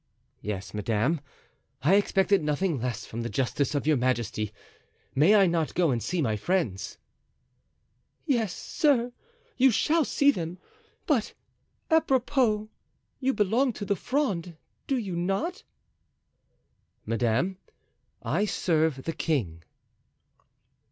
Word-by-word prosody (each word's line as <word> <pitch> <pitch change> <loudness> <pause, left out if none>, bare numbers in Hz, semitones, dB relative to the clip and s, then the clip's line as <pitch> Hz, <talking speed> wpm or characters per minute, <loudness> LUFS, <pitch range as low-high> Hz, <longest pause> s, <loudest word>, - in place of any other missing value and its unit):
"Yes, 100 -3 -5
madame, 110 - 0 0.6
I 160 +7 +4
expected 200 -1 +3
nothing 150 -1 0
less 125 -3 -3
from 115 - -6
the 115 - -3
justice 135 +3 -1
of 140 - -1
your 155 -2 +3
majesty. 120 -4 -1 0.6
May 160 +10 +5
I 200 -2 +6
not 170 -3 0
go 170 -4 +3
and 120 -2 -1
see 175 +4 -1
my 110 -4 0
friends?" 110 - -1 1.3
"Yes, 235 - +1
sir, 250 - +1 0.5
you 265 +1 +6
shall 315 +7 +2
see 285 0 +3
them. 175 - -5 0.5
But, 260 -9 0 0.6
apropos, 255 -8 +2 0.5
you 270 0 +1
belong 230 +6 +2
to 205 - -6
the 200 - +1
Fronde, 185 - -2 0.3
do 270 - +1
you 200 -7 -3
not?" 195 - -1 1.4
"Madame, 120 - 0 0.6
I 210 - +1
serve 160 -8 0
the 165 - -3
king." 105 - -1
175 Hz, 120 wpm, -27 LUFS, -, 1.4 s, I